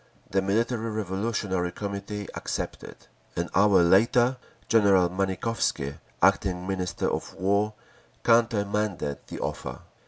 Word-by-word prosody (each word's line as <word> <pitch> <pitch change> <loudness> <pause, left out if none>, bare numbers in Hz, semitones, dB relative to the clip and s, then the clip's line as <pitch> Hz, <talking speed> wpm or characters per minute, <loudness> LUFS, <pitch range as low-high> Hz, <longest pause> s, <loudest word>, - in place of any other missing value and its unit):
The 95 - +2
Military 115 +4 0
Revolutionary 100 -3 -1
Committee 100 +1 -5
accepted. - - -5 0.4
An 85 0 -2
hour 100 -3 +5
later 120 +8 +4 0.3
General 100 -5 +4
Manikovsky, 95 -6 -1 0.2
acting 90 -2 +3
Minister 95 -2 -2
of - - -3
war, 100 +3 +1 0.5
countermanded 105 -8 +1
the - - -7
offer…. - - -4
100 Hz, 100 wpm, -27 LUFS, 95-110 Hz, 0.5 s, hour